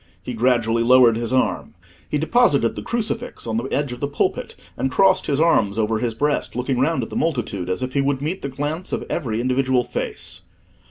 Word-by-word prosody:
He 125 Hz, -, -5 dB
gradually 115 Hz, -1 st, +2 dB
lowered 120 Hz, -1 st, +6 dB
his 115 Hz, 0 st, -3 dB
arm. 130 Hz, 0 st, 0 dB, 0.3 s
He 150 Hz, -, 0 dB
deposited 155 Hz, -, +3 dB
the -, -, -5 dB
crucifix 235 Hz, +1 st, -3 dB
on 110 Hz, -1 st, -2 dB
the 115 Hz, -, -2 dB
edge 140 Hz, 0 st, -1 dB
of 125 Hz, -, -7 dB
the 140 Hz, -, -1 dB
pulpit, 145 Hz, -, -2 dB, 0.2 s
and 135 Hz, -, -1 dB
crossed 185 Hz, +7 st, +3 dB
his 140 Hz, -1 st, +1 dB
arms 115 Hz, -11 st, +3 dB
over 110 Hz, 0 st, 0 dB
his 115 Hz, -2 st, -2 dB
breast, 145 Hz, +1 st, -1 dB
looking 125 Hz, +1 st, -1 dB
round 160 Hz, +5 st, +1 dB
at -, -, -7 dB
the -, -, -6 dB
multitude 110 Hz, -, -2 dB
as 95 Hz, +7 st, -1 dB
if 130 Hz, 0 st, -4 dB
he 140 Hz, -, +2 dB
would 135 Hz, -1 st, 0 dB
meet 155 Hz, +7 st, -3 dB
the 140 Hz, -, -4 dB
glance 145 Hz, +6 st, -4 dB
of -, -, -2 dB
every 115 Hz, -9 st, -2 dB
individual 130 Hz, 0 st, +1 dB
face. 85 Hz, -5 st, -3 dB
130 Hz, 210 wpm, -21 LUFS, 115-145 Hz, 0.3 s, lowered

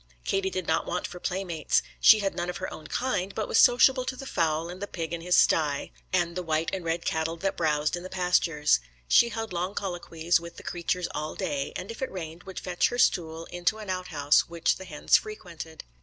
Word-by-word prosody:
Katie 195 Hz, 0 st, 0 dB
did 185 Hz, -2 st, -3 dB
not 160 Hz, -, 0 dB
want 180 Hz, -, -2 dB
for 180 Hz, -, -7 dB
playmates. 180 Hz, -4 st, 0 dB, 0.2 s
She 215 Hz, -1 st, +7 dB
had 195 Hz, -1 st, 0 dB
none 175 Hz, 0 st, -3 dB
of 180 Hz, -, -4 dB
her 185 Hz, -, -5 dB
own 155 Hz, -, -10 dB
kind, 200 Hz, -7 st, -1 dB
but 215 Hz, -, -2 dB
was -, -, +3 dB
sociable 255 Hz, +1 st, +6 dB
to 260 Hz, 0 st, -3 dB
the 270 Hz, -, -8 dB
fowl 165 Hz, -7 st, 0 dB
and 180 Hz, +2 st, -8 dB
the 205 Hz, -, -3 dB
pig 165 Hz, -3 st, -5 dB
in 170 Hz, -, -3 dB
his 180 Hz, +1 st, +2 dB
stye, 150 Hz, -3 st, +3 dB, 0.2 s
and 175 Hz, -2 st, +1 dB
the 180 Hz, -, -2 dB
white 160 Hz, -1 st, -1 dB
and 190 Hz, -2 st, -3 dB
red 165 Hz, +1 st, -2 dB
cattle 160 Hz, +1 st, -1 dB
that 195 Hz, +3 st, -1 dB
browsed 150 Hz, -1 st, +1 dB
in 175 Hz, -, -6 dB
the 185 Hz, -, -8 dB
pastures. 175 Hz, -, +2 dB, 0.3 s
She 235 Hz, -, +5 dB
held 225 Hz, -3 st, -4 dB
long 180 Hz, +3 st, -2 dB
colloquies 175 Hz, -3 st, 0 dB
with 170 Hz, 0 st, -10 dB
the -, -, -10 dB
creatures 175 Hz, 0 st, -2 dB
all 155 Hz, +1 st, -4 dB
day, 140 Hz, -1 st, -2 dB
and 195 Hz, -, -5 dB
if 230 Hz, -, -9 dB
it 265 Hz, -, -2 dB
rained 165 Hz, -2 st, -7 dB
would 190 Hz, -, -6 dB
fetch 180 Hz, -1 st, +1 dB
her 245 Hz, -, -4 dB
stool 165 Hz, -7 st, +1 dB
into 175 Hz, +5 st, 0 dB
an 210 Hz, -3 st, -5 dB
out 185 Hz, 0 st, -3 dB
house 145 Hz, -2 st, +3 dB
which 170 Hz, -1 st, +1 dB
the 190 Hz, -, -9 dB
hens -, -, +3 dB
frequented. 170 Hz, -, -8 dB
175 Hz, 230 wpm, -27 LUFS, 165-190 Hz, 0.3 s, She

